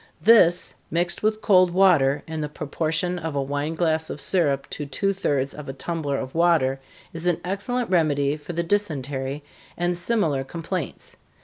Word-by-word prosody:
This, 185 -6 +5 0.2
mixed 175 +2 0
with 215 0 0
cold 185 -3 +5
water, 170 -7 +3
in 160 -1 -5
the 150 - -3
proportion 160 +4 -2
of 160 -3 -5
a 140 - +1
wine 145 +3 -3
glass 160 -1 0
of - - -6
syrup 145 -6 +1
to 150 - -5
two 195 +8 0
thirds 140 -7 -1
of 150 -2 -9
a - - -4
tumbler 145 -1 -3
of 130 -1 -5
water, 160 -6 +2 0.3
is 165 +2 -4
an 175 -2 +2
excellent 230 +6 -2
remedy 145 -5 +2
for 155 +3 -8
the 170 +1 -1
dysentery, 145 -7 -2 0.3
and 175 +1 0
similar 175 -8 0
complaints. 165 +3 -6
160 Hz, 170 wpm, -24 LUFS, 145-180 Hz, 0.3 s, This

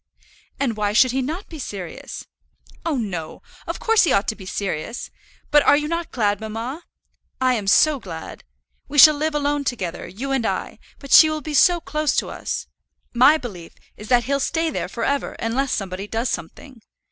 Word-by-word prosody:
"And 240 -6 -1
why 205 -1 0
should 250 +3 +5
he 265 +1 0
not 320 +10 -4
be 320 - -10
serious?" 195 -9 -7 0.6
"Oh, 325 -4 -1
no, 185 -9 -5 0.2
of - - -3
course 450 -1 +3
he 335 - +2
ought 200 -2 +2
to 220 - -2
be 190 -3 -11
serious; 195 +3 -4 0.4
but 295 0 +6
are 285 - +5
you 300 0 -2
not 335 +1 -3
glad, 205 -3 0
mamma? 225 +8 -5 0.6
I 255 -1 +3
am 210 -5 -3
so 300 +7 +4
glad. 165 -7 -9 0.4
We 290 - -5
shall 305 +2 +10
live 305 +1 -2
alone 290 0 0
together, 190 -10 -4
you 245 +10 -6
and 265 -3 +1
I; - - -3 0.2
but 275 -2 -12
she 315 - +9
will 310 0 -3
be 300 +1 -6
so 350 +4 +5
close 305 -2 -1
to - - -1
us! - - -4 0.5
My 260 +6 +6
belief 190 - -9 0.2
is 210 - -11
that 245 0 +3
he'll 280 +4 0
stay 325 +4 0
there - - -3
for 230 - -5
ever 280 +3 -1
unless 255 +4 -2
somebody 195 0 -3
does 230 +3 -2
something. 235 - -7
255 Hz, 195 wpm, -22 LUFS, 210-295 Hz, 0.6 s, shall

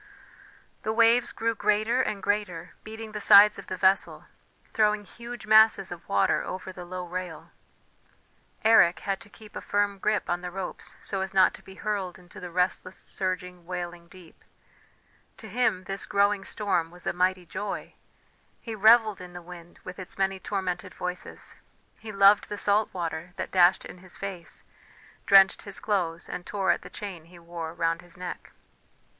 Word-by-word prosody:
The 220 - -2
waves 230 +2 +4
grew 230 0 -1
greater 215 +4 +1
and 210 -5 -3
greater, 205 -5 -2
beating 220 0 -8
the 210 -1 -5
sides 210 +1 +8
of - - -11
the 185 - -4
vessel, 190 +1 +2 0.5
throwing 210 -1 +2
huge 235 +3 -9
masses 220 -3 +5
of 175 -1 -9
water 100 - +2
over 185 0 -6
the 180 -1 -9
low 180 0 -6
rail. 180 +1 -6 1.1
Eric 215 -7 +5
had 195 -1 -2
to - - -13
keep 215 0 -15
a - - -5
firm 205 -1 0
grip 210 +1 0
on 175 0 -1
the 180 - -5
ropes 190 +1 -7
so 195 -1 -3
as 190 0 -5
not 190 -1 +5
to - - -11
be 190 - -13
hurled 195 -3 -3
into 180 -1 -14
the 180 - -7
restless, 180 +1 -1
surging, 180 -2 -4
wailing 175 -1 -6
deep 175 -2 -17 0.9
to - - -11
him 240 -7 0
this 195 +1 -5
growing 200 0 +2
storm 200 -6 -1
was 175 +1 -12
a - - 0
mighty 185 0 +1
joy; 200 +4 -5 0.7
he 230 - -7
revelled 215 -1 +5
in 180 -1 -10
the 175 - -7
wind 175 0 -12
with 180 +1 -9
its 185 - -8
many 195 0 0
tormented 185 -2 -4
voices; 180 0 -6 0.4
he 220 - -8
loved 200 +1 +5
the 205 - -4
salt 205 +1 +2
water 170 0 -5
that - - -5
dashed 180 0 +4
in 180 - -10
his 185 -1 -11
face, 190 -4 -6 0.6
drenched 195 -1 +6
his 200 -1 -7
clothes, 170 -5 -1
and 175 - -7
tore 195 -2 +1
at - - 0
the - - -11
chain 185 -6 -7
he 175 +1 -16
wore 170 -1 -7
round 165 0 0
his 175 -1 -15
neck. 180 -1 -7
190 Hz, 175 wpm, -27 LUFS, 180-210 Hz, 1.1 s, sides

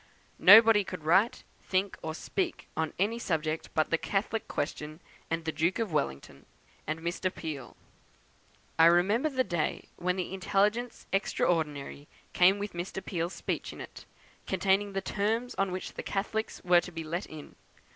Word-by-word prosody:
Nobody 220 +1 +8
could 180 -4 -7
write, 190 +9 +3 0.3
think, 190 +1 +1
or 160 0 -4
speak 360 - -3
on 160 -1 -1
any 215 +5 0
subject 160 -5 -2
but 155 - +1
the 165 - +2
Catholic 210 +2 -2
question, 150 +1 -4 0.3
and 165 0 -2
the 160 - 0
Duke 165 +4 0
of 220 -7 -2
Wellington, 70 - -3 0.4
and 155 +1 -3
Mr. 175 +2 -2
Peel. 150 -8 -7 1.0
I 165 - +8
remember 200 - +3
the 260 -3 +1
day 170 -8 -2
when 180 +1 0
the 185 0 -4
Intelligence 210 +5 0
Extraordinary 150 -7 -1 0.3
came 185 +3 +5
with 205 0 -5
Mr. 175 +2 -5
Peel's 170 -1 -2
speech - - -3
in - - -11
it, - - -10 0.4
containing 195 +2 +1
the 195 - -1
terms 220 +5 -1
on 195 -1 +1
which 185 +1 -5
the - - -5
Catholics 215 +2 -3
were 175 -1 +5
to 180 - -9
be 165 -1 -5
let 170 +5 -4
in! 155 -2 -10
180 Hz, 160 wpm, -29 LUFS, 160-205 Hz, 1.0 s, Nobody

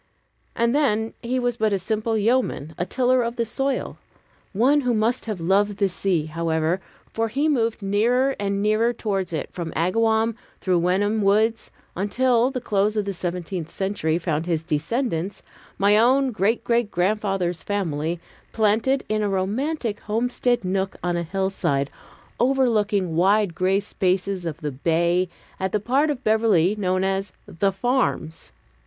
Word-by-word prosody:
And 235 +2 +1
then 225 -7 +1
he 250 +2 -1
was 245 -2 0
but 220 -1 +1
a 200 - +2
simple 220 +4 -1
yeoman, 215 - 0
a 175 - -3
tiller 255 +3 +2
of 235 0 -2
the 235 - 0
soil; 270 +4 -2 0.5
one 260 +8 +3
who 250 -3 +1
must 225 +3 0
have 210 -5 -3
loved 195 +4 +2
the 200 -1 +2
sea, 180 -3 0
however, 160 +2 -1 0.3
for 225 0 0
he 280 +7 0
moved 230 -7 0
nearer 240 +7 +2
and 200 0 -1
nearer 215 +3 +2
towards 195 -6 -2
it 155 -4 -4
from 170 -2 -4
Agawam 220 +6 +2 0.3
through 180 -2 +1
Wenham 205 +5 +1
woods, 215 +3 +2 0.3
until 240 +5 +2
the 260 -2 -3
close 210 -2 0
of 210 - 0
the 200 - -2
seventeenth 175 -1 -4
century 190 -5 -1
found 165 -1 -2
his 165 -2 0
descendants 180 - -2 0.3
my 200 +1 +4
own 260 +4 +4
great 215 +2 0
great 235 -2 +1
grandfather's 190 -2 0
family 170 -5 -2 0.3
planted 225 +5 +2
in 215 0 0
a 205 - 0
romantic 215 +5 -1
homestead 240 +1 0
nook 190 +1 -1
on 175 -1 0
a 170 - 0
hillside, 170 -6 -1 0.5
overlooking 215 -8 +2
wide 195 +2 +3
gray 190 +2 +2
spaces 190 -2 -1
of 160 +1 -5
the 150 -1 -2
bay 170 +6 +1 0.3
at 190 0 -1
the 210 - +1
part 265 +8 +1
of 275 -3 -3
Beverly 215 -4 +3
known 185 -2 0
as 195 0 -1
"The 195 +4 0
Farms." 195 -6 -1
205 Hz, 155 wpm, -23 LUFS, 180-230 Hz, 0.5 s, my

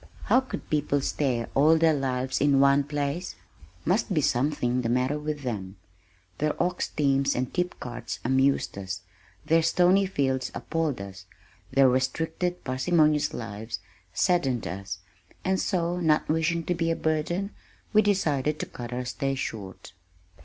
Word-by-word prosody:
How - - +4
could 260 - -7
people 145 -1 +1
stay 130 -4 0
all 155 +4 +5
their 160 0 +4
lives 130 -2 -1
in 140 -1 +4
one 140 +1 +5
place? 145 +4 -3 0.5
Must 195 +5 +1
be - - +4
something 125 -2 +1
the 115 - -1
matter 130 +4 +1
with 150 -1 -4
them. 100 -6 -4 0.6
Their 150 0 0
ox 180 +1 0
teams 140 -2 +1
and 125 0 -2
tipcarts 180 -9 -3
amused 130 -4 +2
us, 95 -1 -5 0.4
their 165 +1 +4
stony 180 +4 +4
fields 130 -7 -1
appalled 160 -6 -1
us, 95 -2 -9 0.4
their 135 0 +5
restricted, 160 +7 0
parsimonious 150 +3 +2
lives 110 0 -5 0.3
saddened 135 - +1
us, 95 -2 -5 0.5
and 190 0 +2
so, 175 -1 0
not 155 -3 +2
wishing 165 +1 +1
to 180 - 0
be 165 -1 0
a 165 - +1
burden, 165 +6 -1 0.4
we 215 - +7
decided 155 -8 +1
to - - -2
cut 120 -1 -8
our 125 +1 -3
stay 135 +2 -2
short. 95 -8 -6
145 Hz, 145 wpm, -27 LUFS, 125-165 Hz, 0.6 s, we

